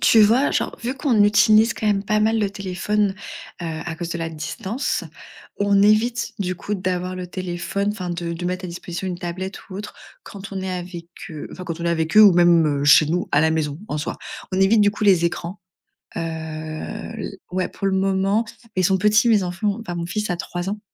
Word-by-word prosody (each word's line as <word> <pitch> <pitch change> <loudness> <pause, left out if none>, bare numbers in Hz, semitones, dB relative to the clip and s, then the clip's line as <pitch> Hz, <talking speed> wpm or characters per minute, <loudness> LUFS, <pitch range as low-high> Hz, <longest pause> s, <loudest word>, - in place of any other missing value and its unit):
tu 220 +6 +6
vois? 230 +7 +5
Genre, - - -1
vu 245 +3 -3
qu'on 250 -7 +3
utilise 215 +2 +5
quand 215 - -3
même 200 -1 +1
pas 215 +1 +1
mal 220 +1 +2
le 205 -2 +1
téléphone, 200 +1 -1 0.5
heu, - - -5 0.2
à 165 -2 -5
cause 170 0 -5
de 170 - -3
la 165 - -2
distance, 175 - -3 0.6
on 200 -1 +3
évite, 225 +3 +2
du 185 -2 -1
coup, 205 +4 -4
d'avoir 185 -1 -2
le 180 - -5
téléphone 185 +2 -3
enfin 185 -4 -4
de 170 -1 -3
de 170 +1 -5
mettre 185 +1 -3
à 180 - -4
disposition 175 +2 -5
une 175 -1 -4
tablette 185 +3 -6
ou 185 - -7
autre, 205 +1 -7 0.3
quand 200 0 -10
on 190 - -3
est 190 - -3
avec 175 -1 -6 0.2
eux 155 -2 -7
enfin, 185 - -8
quand 165 -1 -5
on - - -3
est - - +1
avec 165 +2 -1
eux 215 - +10
ou 205 - +9
même, 165 -5 +4
heu, - - 0
chez 145 +1 +7
nous, 175 +3 -1
à 140 - +5
la 160 +1 +3
maison, 150 -2 -1
en 150 - -2
soi. 150 - -4 0.3
On 185 - +1
évite, 210 +3 +5
du 205 - +5
coup, 210 - -7
les 185 -5 +5
écrans, 170 +1 -3 0.6
heu, - - -1
l 160 -1 -5 0.2
ouais, 185 0 -1
pour 195 - -4
le 195 - +1
moment, 195 +3 +1 0.3
ils 185 - +1
sont 190 +2 +4
petits, 210 +4 +4
mes 215 -4 +4
enfants, 190 +3 -1
enfin, 175 -6 -5
mon 170 0 -3
fils 210 +1 -3
a 175 - 0
3 175 +1 -4
ans. 210 +1 -4
185 Hz, 225 wpm, -22 LUFS, 170-205 Hz, 0.6 s, eux